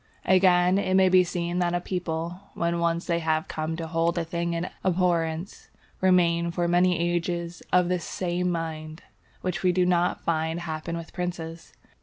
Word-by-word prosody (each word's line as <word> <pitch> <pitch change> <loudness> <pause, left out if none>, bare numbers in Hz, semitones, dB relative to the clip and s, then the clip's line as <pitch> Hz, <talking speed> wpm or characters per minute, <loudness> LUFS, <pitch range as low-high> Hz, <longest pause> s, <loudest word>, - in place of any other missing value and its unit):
Again, 185 0 +4
it 185 -2 0
may 190 -1 +5
be 185 0 +6
seen 175 0 -2
that 175 -1 +1
a - - +1
people, 175 -1 -3 0.2
when 170 0 0
once 170 0 0
they 170 -1 0
have 160 -1 0
come 155 +1 -3
to 165 0 -4
hold 165 +1 0
a 170 - +1
thing 170 +1 -2
in 170 +2 -2 0.2
abhorrence, 175 -1 0 0.3
remain 170 -2 +3
for 175 0 -1
many 175 0 +3
ages 170 0 -2
of 180 -1 +4
the 180 0 0
same 180 +1 -2
mind; 160 -1 -4 0.4
which 180 -1 -2
we 185 - +3
do 180 0 +2
not 180 0 +1
find 160 +1 -1
happen 165 0 -4
with 165 -1 -9
princes. 170 -2 -5
170 Hz, 175 wpm, -26 LUFS, 165-180 Hz, 0.4 s, be